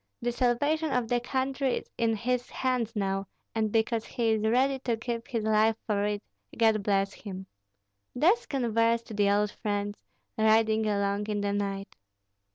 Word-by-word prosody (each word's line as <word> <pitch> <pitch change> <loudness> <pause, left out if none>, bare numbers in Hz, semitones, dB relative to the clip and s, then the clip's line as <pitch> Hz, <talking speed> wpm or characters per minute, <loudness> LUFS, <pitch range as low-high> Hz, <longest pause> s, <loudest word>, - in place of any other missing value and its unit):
"The 240 - -1
salvation 285 +6 +1
of 250 -4 0
the 245 - +2
country 265 +1 -1
is - - -7
in 225 -1 +1
his 245 +3 -1
hands 250 -3 -1
now, 195 -1 -1 0.3
and 220 -1 0
because 225 0 +1
he 230 -2 0
is 220 -1 +1
ready 260 +5 +2
to 240 -3 -1
give 230 0 -4
his 230 -4 -2
life 220 +1 +3
for 205 -2 0
it, 210 0 -2 0.3
God 220 -2 +4
bless 195 0 +1
him!" 190 -2 -8 0.7
Thus 360 - +3
conversed 230 -3 +1
the 205 -1 +3
old 205 +1 +2
friends, 205 -1 -3 0.4
riding 220 0 +3
along 200 0 0
in 210 -1 -1
the 200 0 0
night. 195 -1 -3
225 Hz, 165 wpm, -28 LUFS, 205-245 Hz, 0.7 s, God